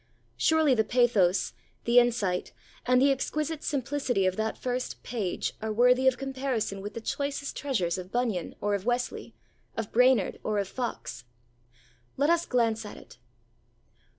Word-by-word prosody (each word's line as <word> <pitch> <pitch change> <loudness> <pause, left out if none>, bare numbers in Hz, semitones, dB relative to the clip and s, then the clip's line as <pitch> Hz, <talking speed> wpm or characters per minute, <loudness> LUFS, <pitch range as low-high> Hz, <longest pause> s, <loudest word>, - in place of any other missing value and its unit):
Surely 315 -3 +3
the 220 -3 +3
pathos, 215 -7 +2 0.3
the 240 +1 +6
insight, 220 -7 0 0.3
and 250 0 +5
the 275 +2 +5
exquisite 305 +3 -2
simplicity 265 -6 0
of 185 0 +1
that 220 +1 -2
first 250 0 -3
page 210 -7 -2
are 220 0 -2
worthy 250 +4 +4
of 260 -1 +4
comparison 260 -7 -2
with 205 +2 -7
the - - -3
choicest 280 +3 -3
treasures 190 -11 -1
of 185 +1 -9
Bunyan 235 -8 -1
or 205 0 0
of 200 -2 -1
Wesley, 245 0 -2 0.4
of 225 -2 -3
Brainerd 250 -4 +3
or 215 -1 -1
of 200 -1 0
Fox. 195 - -5 0.9
Let 290 +4 +3
us 340 0 +2
glance 225 -3 +1
at 210 - -9
it. 110 +3 -15
240 Hz, 150 wpm, -28 LUFS, 205-265 Hz, 0.9 s, the